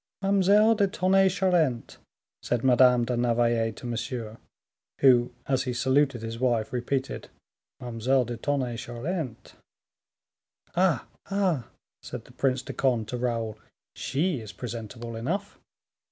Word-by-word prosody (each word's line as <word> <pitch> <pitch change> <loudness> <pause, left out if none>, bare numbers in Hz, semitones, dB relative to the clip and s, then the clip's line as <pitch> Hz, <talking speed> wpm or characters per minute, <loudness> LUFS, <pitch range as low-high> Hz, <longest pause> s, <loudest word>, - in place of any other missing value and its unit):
"Mademoiselle 200 +3 +5
de 205 -2 +2
Tonnay 190 0 +3
Charente," 175 -10 +1 0.4
said 120 -2 -1
Madame 125 -1 +5
de 125 +1 -1
Navailles 120 -1 +2
to - - -10
Monsieur, 115 -1 -4 0.6
who, 125 -3 +5
as 135 -1 0
he 125 - -2
saluted 130 0 +1
his 115 0 -5
wife, 120 -3 0
repeated 130 +2 -2 0.5
"Mademoiselle 125 +2 +1
de 120 +1 -4
Tonnay 130 -2 -1
Charente." 125 +3 -5 1.2
"Ah! 175 -7 +2 0.2
ah!" 190 -10 0 0.3
said - - -8
the - - -16
Prince 130 -1 0
de - - -7
Conde 120 -5 +1
to 125 - -3
Raoul, 115 -3 -2 0.3
"she 155 +1 -1
is 110 -2 -8
presentable 115 -1 -6
enough." 185 - -3
125 Hz, 125 wpm, -27 LUFS, 120-155 Hz, 1.2 s, Mademoiselle